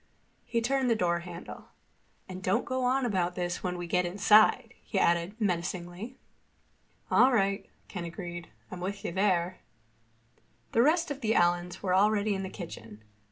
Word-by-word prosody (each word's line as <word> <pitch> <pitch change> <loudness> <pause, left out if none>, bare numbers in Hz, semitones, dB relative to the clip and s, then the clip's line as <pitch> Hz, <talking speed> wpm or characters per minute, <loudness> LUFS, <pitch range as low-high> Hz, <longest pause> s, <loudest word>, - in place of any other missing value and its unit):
He 235 - -1
turned 265 +1 +1
the 230 - +3
door 175 -4 +1
handle. 170 0 -9 0.6
"And 185 0 -7
don't 185 +1 +1
go 255 0 -2
on 260 +1 +2
about 180 -5 0
this 175 -1 -3
when 180 -1 -2
we 175 - -4
get 180 +1 +1
inside," 200 +4 +4
he - - -5
added 170 +5 +1
menacingly. 180 +3 -3 0.9
"All 260 - +6
right," 195 -3 +1 0.2
Ken 180 -3 -6
agreed. 175 0 -7 0.2
"I'm 180 - -6
with 200 +2 -5
you - - -2
there." 185 -1 +1 1.1
The 230 - +3
rest 320 +4 +3
of 280 0 -5
the 225 -1 +1
Allens 175 +1 +1
were 185 -2 +1
already 205 +2 +3
in 195 - -2
the 190 - -4
kitchen. 110 - -9
185 Hz, 160 wpm, -29 LUFS, 175-215 Hz, 1.1 s, All